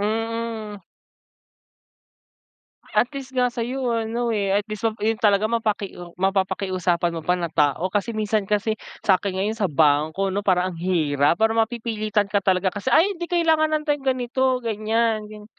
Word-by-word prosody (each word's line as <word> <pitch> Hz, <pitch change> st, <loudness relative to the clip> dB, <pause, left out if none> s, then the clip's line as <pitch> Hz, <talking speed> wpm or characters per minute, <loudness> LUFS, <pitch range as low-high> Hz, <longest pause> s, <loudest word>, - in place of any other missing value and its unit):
mm. 220 Hz, -2 st, -3 dB, 2.1 s
At 245 Hz, -, +3 dB
least, 265 Hz, -1 st, -7 dB
nga 250 Hz, -1 st, +2 dB
sa'yo 245 Hz, +2 st, -2 dB, 0.2 s
ano, 235 Hz, +1 st, -1 dB
eh, 200 Hz, -2 st, 0 dB
at 205 Hz, -, -5 dB
least, 215 Hz, +2 st, -2 dB
ma 220 Hz, -, -1 dB
'yon 220 Hz, 0 st, +1 dB
talaga 210 Hz, 0 st, +3 dB
mapaki 215 Hz, -4 st, -1 dB, 0.2 s
mapapakiusapan 185 Hz, -2 st, 0 dB
mo 165 Hz, -, -5 dB
pa 180 Hz, -, +3 dB
na 170 Hz, -2 st, -3 dB
tao. 155 Hz, +3 st, +1 dB
Kasi, 215 Hz, +3 st, -1 dB
minsan 215 Hz, -1 st, 0 dB
kasi, 210 Hz, +1 st, 0 dB, 0.3 s
sa'kin 190 Hz, -1 st, +2 dB
ngayon, 210 Hz, +3 st, -1 dB
sa 200 Hz, -, +2 dB
bangko, 155 Hz, +4 st, +2 dB
'no, 200 Hz, +2 st, -2 dB
parang 185 Hz, 0 st, +2 dB
ang -, -, -10 dB
hirap, 155 Hz, -4 st, +1 dB
para 225 Hz, 0 st, +3 dB
mapipilitan 220 Hz, -3 st, -1 dB
ka 205 Hz, -, +3 dB
talaga 185 Hz, 0 st, +2 dB
kasi 205 Hz, +7 st, -3 dB
"Ay, 390 Hz, +5 st, +4 dB
'di, 345 Hz, -, -3 dB
kailangan 325 Hz, -3 st, +3 dB
nan 305 Hz, -, 0 dB
tayong 290 Hz, -2 st, -1 dB
ganito, 255 Hz, +1 st, 0 dB
ganyan", 220 Hz, 0 st, 0 dB
gan 210 Hz, 0 st, -11 dB
210 Hz, 160 wpm, -23 LUFS, 190-230 Hz, 2.1 s, Ay